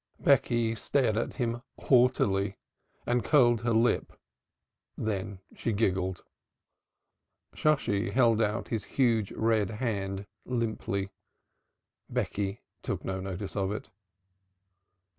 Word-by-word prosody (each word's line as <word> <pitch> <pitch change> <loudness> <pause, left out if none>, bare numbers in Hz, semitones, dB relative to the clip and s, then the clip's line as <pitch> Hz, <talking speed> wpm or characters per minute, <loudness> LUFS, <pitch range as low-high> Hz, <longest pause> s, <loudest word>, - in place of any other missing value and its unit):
Becky 115 -1 +3
stared 115 0 +1
at 115 - -2
him 120 -2 -1 0.2
haughtily 100 -6 +3 0.5
and 120 -1 +1
curled 120 -6 +4
her 120 0 0
lip. 115 +2 +2 0.8
Then 100 -2 -3
she 115 - -2
giggled. 95 -4 0 1.3
Shosshi 120 -8 +1
held 115 -3 +3
out 105 +1 -1
his 110 -4 -2
huge 115 -6 +3
red 110 -3 +1
hand 100 -4 -3 0.2
limply. 110 -5 -2 1.0
Becky 100 +1 -2 0.2
took - - -4
no 95 0 -2
notice 95 +1 -5
of 100 -1 0
it. 105 - -6
110 Hz, 105 wpm, -29 LUFS, 100-120 Hz, 1.3 s, curled